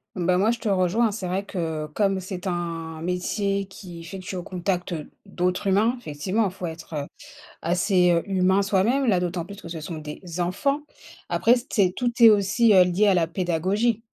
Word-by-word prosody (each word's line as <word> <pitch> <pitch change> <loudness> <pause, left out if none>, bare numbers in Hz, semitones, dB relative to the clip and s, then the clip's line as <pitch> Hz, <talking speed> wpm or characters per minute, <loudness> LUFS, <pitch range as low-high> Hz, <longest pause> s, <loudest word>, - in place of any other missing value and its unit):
Bah 180 -1 +1
moi 200 +5 +3
je 235 - -1
te 225 - -3
rejoins, 195 +4 +2
c'est 200 -2 -5
vrai 185 +2 -1
que 160 -5 -3
comme 195 -2 +1
c'est 185 0 -7
un 165 -3 -3
métier 195 +3 -1
qui 185 -2 -11
est - - -9
effectué 185 +3 -7
au 180 - -4
contact 180 0 -2 0.3
d'autres 180 0 -1
humains, 215 +6 +3
effectivement, 185 +3 -1
il 195 - 0
faut 185 -1 -6
être, 165 0 -8
heu, - - -10 0.5
assez, 180 +1 +2
heu, 170 -1 +3
humain 190 0 +2
soi-même. 215 +7 +2
Là 185 -5 +3
d'autant 175 -1 -2
plus 200 +3 -10
que 165 - -10
ce 165 -2 -6
sont 160 0 -5
des 150 +2 -8 0.2
enfants, 200 +12 0 0.5
après 240 +2 +4
c'est 190 -5 +3
tout 245 +2 0
est 230 - +11
aussi, 210 +2 +3
heu, 185 -2 +7
lié 185 +4 +2
à - - +5
la 170 -2 +2
pédagogie. 190 +7 0
185 Hz, 195 wpm, -24 LUFS, 175-200 Hz, 0.5 s, est